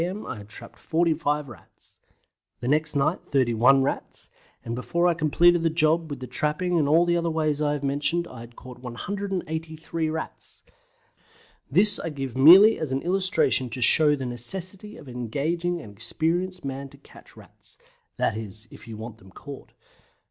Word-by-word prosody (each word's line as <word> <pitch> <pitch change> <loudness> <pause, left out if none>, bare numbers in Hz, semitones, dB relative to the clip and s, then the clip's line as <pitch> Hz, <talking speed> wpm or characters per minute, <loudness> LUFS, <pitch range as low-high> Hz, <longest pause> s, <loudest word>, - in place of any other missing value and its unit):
m. 190 +5 -4
I - - -6
had 100 0 -12
trapped - - -10
45 155 -3 0
Rats; 110 -9 -17 0.6
the 120 - -5
next 150 +2 +1
night 140 - +1
31 130 0 +3
Rats; 135 - -4 0.3
and 115 - -4
before 170 +8 -1
I 175 - +3
completed 165 +2 +3
the 165 - +2
job, 160 0 +1
with 145 - -6
the 130 - -6
trapping 165 +6 0
and 145 - +1
the 170 +3 +4
other 170 -1 0
ways 155 -2 0
that 150 - +1
I 145 - +1
have 145 -1 -4
mentioned, 145 +5 -1
I 120 -2 -10
caught 125 +1 -13
183 160 +2 -4
Rats! 160 0 -7 1.1
This 195 +9 +5
I - - -4
give 135 -4 -5
merely 185 +11 +8
as 155 -4 -3
an 135 +1 -1
illustration 185 -8 +1
to 125 +2 -6
show 150 +4 +5
the 135 -2 -5
necessity 185 - -3
of - - -13
engaging 150 +9 -2
an 110 -10 -10
experienced 165 - -2
man 135 0 -5
to 140 - -16
catch 140 - -18
Rats - - -9 0.4
that - - 0
is, 110 0 -4
if - - -14
you 110 -2 -8
want 110 0 -9
them 95 - -17
caught. 140 +8 -11
150 Hz, 170 wpm, -25 LUFS, 130-170 Hz, 1.1 s, merely